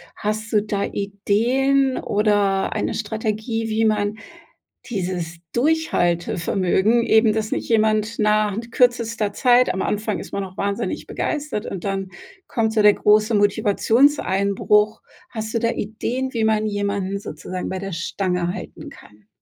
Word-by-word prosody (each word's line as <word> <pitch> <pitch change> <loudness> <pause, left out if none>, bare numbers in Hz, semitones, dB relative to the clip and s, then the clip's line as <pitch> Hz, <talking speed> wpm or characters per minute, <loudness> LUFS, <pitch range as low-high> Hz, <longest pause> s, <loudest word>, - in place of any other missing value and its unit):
Hast 215 +1 -3
du 210 -2 +3
da 205 -2 -2
Ideen 245 +7 +1
oder 205 -2 +1
eine - - -2
Strategie, 220 +1 -3
wie 220 +1 +1
man 210 -1 0 0.7
dieses 180 -6 -4
Durchhaltevermögen 200 - +1
eben, 220 -1 +4
dass 215 0 -2
nicht - - -3
jemand 215 0 +1
nach 210 -1 +2
kürzester 230 -3 +1
Zeit 250 +3 +3
am 190 - -2
Anfang 210 -3 -2
ist - - -10
man 200 - -2
auch 185 -1 -11
wahnsinnig 200 0 -2
begeistert 295 -8 -3
und 190 -3 -6
dann 195 -1 -2 0.4
kommt 220 -2 0
so 220 - +2
der 210 -1 +6
große 215 +2 +3
Motivationseinbruch. 210 0 +2 0.3
Hast 220 -1 -5
du 230 - +1
da 230 0 +1
Ideen, 245 +5 -3
wie 225 -2 0
man 215 -1 +2
jemanden 200 -2 -2
sozusagen 180 0 -6
bei 190 - -4
der 195 0 -5
Stange 180 +1 -2
halten - - -9
kann? 105 -1 -17
210 Hz, 140 wpm, -21 LUFS, 200-225 Hz, 0.7 s, der